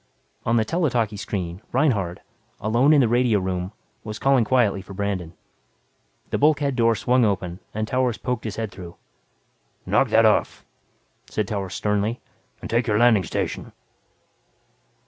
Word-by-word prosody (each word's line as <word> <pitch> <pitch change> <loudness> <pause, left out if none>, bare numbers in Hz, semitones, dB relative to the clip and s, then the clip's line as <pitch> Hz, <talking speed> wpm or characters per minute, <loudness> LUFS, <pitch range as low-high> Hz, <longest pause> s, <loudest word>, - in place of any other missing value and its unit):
On 115 - +3
the 110 - +2
tele 165 +5 0
talkie 115 -4 0
screen, 95 -3 -4
Reinhardt, 110 - +1 0.4
alone 120 +7 +3
in 150 -2 +6
the 125 - +3
radio 120 -1 +3
room, 90 0 -3 0.3
was 105 -1 -6
calling 135 -3 +3
quietly 110 -5 +2
for 95 0 -11
Brandon. 95 -4 -3 1.0
The - - 0
bulkhead 145 -2 +2
door 115 -2 +3
swung 125 +3 +2
open 95 -4 -1
and 110 0 -3
Towers 125 -1 0
poked 125 -3 -3
his 110 -1 -4
head 110 -2 -4
through. 85 -3 -10 0.9
"Knock - - +3
that - - +5
off," - - +1 0.6
said 105 -2 -2
Towers 95 -3 -4
sternly, 105 +3 -1 0.4
"and - - -6
take 120 +2 0
your 105 -2 +2
landing 115 -4 +5
station." - - -4
110 Hz, 150 wpm, -23 LUFS, 100-125 Hz, 1.0 s, in